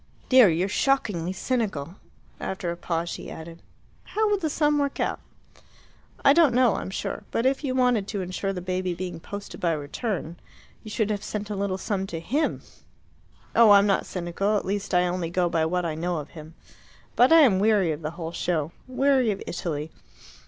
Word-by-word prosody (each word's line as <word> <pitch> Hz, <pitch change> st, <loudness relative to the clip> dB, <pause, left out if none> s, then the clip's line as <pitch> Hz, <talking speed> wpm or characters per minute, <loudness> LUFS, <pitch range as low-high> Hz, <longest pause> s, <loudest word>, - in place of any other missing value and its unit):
"Dear, 255 Hz, -6 st, +8 dB
you're 170 Hz, +3 st, +1 dB
shockingly 205 Hz, -7 st, 0 dB
cynical." 190 Hz, -, -2 dB, 0.5 s
After 185 Hz, -2 st, -3 dB
a -, -, -4 dB
pause 170 Hz, -1 st, -2 dB
she -, -, -6 dB
added, 165 Hz, +1 st, -9 dB, 0.4 s
"How 430 Hz, 0 st, 0 dB
would 405 Hz, -1 st, +1 dB
the 315 Hz, -, 0 dB
sum 295 Hz, 0 st, +2 dB
work 280 Hz, -1 st, -1 dB
out?" -, -, -1 dB, 1.1 s
"I 280 Hz, -, +8 dB
don't 300 Hz, -6 st, +4 dB
know, 250 Hz, -3 st, +4 dB
I'm -, -, -5 dB
sure. 190 Hz, -, -4 dB
But 230 Hz, -, -1 dB
if 270 Hz, +3 st, +1 dB
you 260 Hz, -3 st, -1 dB
wanted 245 Hz, -6 st, +2 dB
to 205 Hz, -2 st, -3 dB
ensure 185 Hz, +2 st, -3 dB
the 180 Hz, -2 st, -5 dB
baby 185 Hz, -1 st, -2 dB
being 175 Hz, -1 st, -5 dB
posted 200 Hz, +5 st, -8 dB
by 170 Hz, -2 st, +2 dB
return, 160 Hz, -, -4 dB, 0.4 s
you 215 Hz, -, -10 dB
should 215 Hz, 0 st, 0 dB
have 205 Hz, -1 st, -3 dB
sent 210 Hz, 0 st, -5 dB
a -, -, -2 dB
little 195 Hz, -1 st, -1 dB
sum 195 Hz, -1 st, -2 dB
to 165 Hz, -3 st, -5 dB
HIM. 270 Hz, -, -1 dB, 0.9 s
Oh, 230 Hz, -2 st, +7 dB
I'm 200 Hz, 0 st, +7 dB
not 195 Hz, -2 st, +1 dB
cynical 185 Hz, +4 st, -1 dB
at -, -, -3 dB
least 200 Hz, +1 st, -3 dB
I 180 Hz, 0 st, +4 dB
only 175 Hz, -1 st, -2 dB
go 175 Hz, 0 st, +1 dB
by 165 Hz, -1 st, +1 dB
what 180 Hz, +1 st, -1 dB
I 165 Hz, -, -1 dB
know 170 Hz, +2 st, -2 dB
of 150 Hz, -1 st, -6 dB
him. 160 Hz, 0 st, -11 dB, 0.6 s
But 250 Hz, +4 st, +5 dB
I 325 Hz, 0 st, +8 dB
am 215 Hz, -10 st, +5 dB
weary 205 Hz, -5 st, +3 dB
of 150 Hz, +1 st, -4 dB
the 155 Hz, -, -3 dB
whole 165 Hz, -2 st, -4 dB
show. 165 Hz, -3 st, -1 dB, 0.2 s
Weary 260 Hz, -1 st, +2 dB
of 200 Hz, -2 st, -1 dB
Italy. 160 Hz, -3 st, -4 dB
190 Hz, 195 wpm, -25 LUFS, 170-235 Hz, 1.1 s, Dear